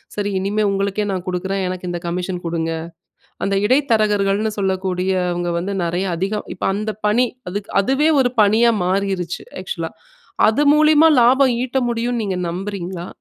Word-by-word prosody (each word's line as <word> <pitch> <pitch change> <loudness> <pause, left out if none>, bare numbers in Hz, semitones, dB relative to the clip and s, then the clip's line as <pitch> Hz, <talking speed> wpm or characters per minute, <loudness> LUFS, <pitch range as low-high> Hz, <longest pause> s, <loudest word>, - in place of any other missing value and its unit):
சரி 205 -1 -2
இனிமே 205 +3 0
உங்களுக்கே 200 +1 -1
நான் 185 -1 -4
குடுக்றேன் 190 +2 -2
எனக்கு 180 0 -4
இந்த 175 -1 -4
கமிஷன் 180 +1 -3
கொடுங்க. 165 -1 -2 0.7
அந்த 195 0 0
இடைத்தரகர்கள்னு 215 -5 +2
சொல்லக்கூடியவங்க 185 -2 -1
வந்து 195 +3 -3
நிறைய 175 +3 -1
அதிகோ 200 +4 -2
இப்ப - - -4
அந்த 215 +1 -3
பணி, 240 +4 +3 0.2
அதுக்கு 205 +2 -5
அதுவே 270 +8 +2
ஒரு 245 -2 +1
பணியா 220 +3 +4
மாறிடுச்சு 185 -2 -1 0.2
ஆக்ஸூலா. 485 - -4 0.6
அது 230 +7 +2
மூலியமா 310 +1 +5
லாபம் 255 +1 +4
ஈட்ட 260 +1 -1
முடியும்னு 235 0 -1
நீங்க 190 -2 -2
நம்புறீங்களா? 185 -1 -5
200 Hz, 140 wpm, -19 LUFS, 185-225 Hz, 0.7 s, மூலியமா